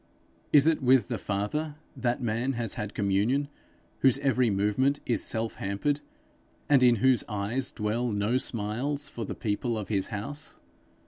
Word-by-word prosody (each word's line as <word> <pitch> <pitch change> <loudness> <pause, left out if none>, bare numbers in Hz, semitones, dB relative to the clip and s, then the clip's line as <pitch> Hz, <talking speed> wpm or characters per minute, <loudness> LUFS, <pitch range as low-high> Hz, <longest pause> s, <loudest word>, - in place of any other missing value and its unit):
Is 145 -1 +6
it 160 -2 +3
with 130 -4 +4
the - - -2
Father 145 +10 -2 0.2
that 125 +1 -1
man 120 +4 0
has 115 -4 -2
had 105 -1 -5
communion, 105 +9 +1 0.5
whose 135 -1 +4
every 130 -3 +2
movement 105 +8 +1
is 120 - +1
self 115 0 -2
hampered, 120 +10 -1 0.7
and 140 -3 +5
in 125 -1 +6
whose 125 +3 +3
eyes 105 +5 -2
dwell 115 +2 -1
no 105 +5 +1
smiles 130 +6 -1
for 120 -5 -6
the - - -5
people 115 +1 -2
of 105 - -5
his 100 -3 0
house? 145 +9 -5
120 Hz, 155 wpm, -28 LUFS, 105-135 Hz, 0.7 s, Is